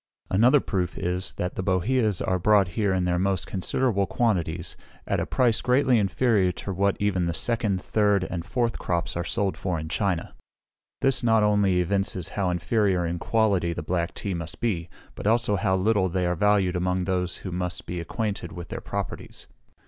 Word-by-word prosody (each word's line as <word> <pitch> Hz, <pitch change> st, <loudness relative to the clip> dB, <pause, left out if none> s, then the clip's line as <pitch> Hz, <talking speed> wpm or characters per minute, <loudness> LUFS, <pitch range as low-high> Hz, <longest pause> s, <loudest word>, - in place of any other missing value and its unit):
Another 120 Hz, +9 st, +5 dB
proof 95 Hz, -8 st, -2 dB
is, 90 Hz, +1 st, -2 dB
that 90 Hz, -, -3 dB
the -, -, -3 dB
boheas 100 Hz, +3 st, +1 dB
are 95 Hz, 0 st, 0 dB
brought 100 Hz, 0 st, +4 dB
here 100 Hz, +2 st, 0 dB
in 95 Hz, -1 st, +1 dB
the 90 Hz, 0 st, +1 dB
most 95 Hz, -1 st, 0 dB
considerable 100 Hz, +1 st, 0 dB
quantities, 85 Hz, -7 st, -1 dB, 0.3 s
at -, -, 0 dB
a -, -, -2 dB
price 120 Hz, -3 st, +2 dB
greatly 125 Hz, -1 st, +3 dB
inferior 100 Hz, -1 st, +2 dB
to 100 Hz, -, -5 dB
what 100 Hz, +2 st, +1 dB
even 95 Hz, -4 st, +1 dB
the 85 Hz, -, -2 dB
second, 110 Hz, -1 st, 0 dB
third, 105 Hz, -1 st, +2 dB
and 90 Hz, -2 st, -4 dB
fourth 115 Hz, +7 st, -1 dB
crops 85 Hz, -1 st, -2 dB
are 85 Hz, -, -1 dB
sold 95 Hz, +3 st, -1 dB
for 90 Hz, -4 st, -2 dB
in 80 Hz, 0 st, -6 dB
China. 95 Hz, -1 st, -1 dB, 0.7 s
This 135 Hz, -1 st, +3 dB
not 110 Hz, -2 st, +3 dB
only 100 Hz, -3 st, +3 dB
evinces 95 Hz, -2 st, -1 dB
how 100 Hz, -3 st, -1 dB
inferior 90 Hz, +1 st, +1 dB
in 85 Hz, +1 st, -2 dB
quality 100 Hz, -5 st, +1 dB
the 80 Hz, -, -5 dB
black 85 Hz, +1 st, -2 dB
tea 100 Hz, -, -3 dB
must 85 Hz, 0 st, -4 dB
be, 90 Hz, -8 st, -1 dB, 0.2 s
but -, -, -5 dB
also 115 Hz, -1 st, +2 dB
how 95 Hz, 0 st, +1 dB
little 95 Hz, 0 st, +2 dB
they 90 Hz, +1 st, -1 dB
are 90 Hz, -, +1 dB
valued 100 Hz, -1 st, +2 dB
among 90 Hz, +1 st, 0 dB
those 90 Hz, -1 st, -1 dB
who 95 Hz, -, -3 dB
must 90 Hz, 0 st, -3 dB
be 90 Hz, -, -4 dB
acquainted 100 Hz, +1 st, -3 dB
with 85 Hz, -1 st, -8 dB
their -, -, -5 dB
properties. -, -, -6 dB
95 Hz, 185 wpm, -25 LUFS, 90-105 Hz, 0.7 s, Another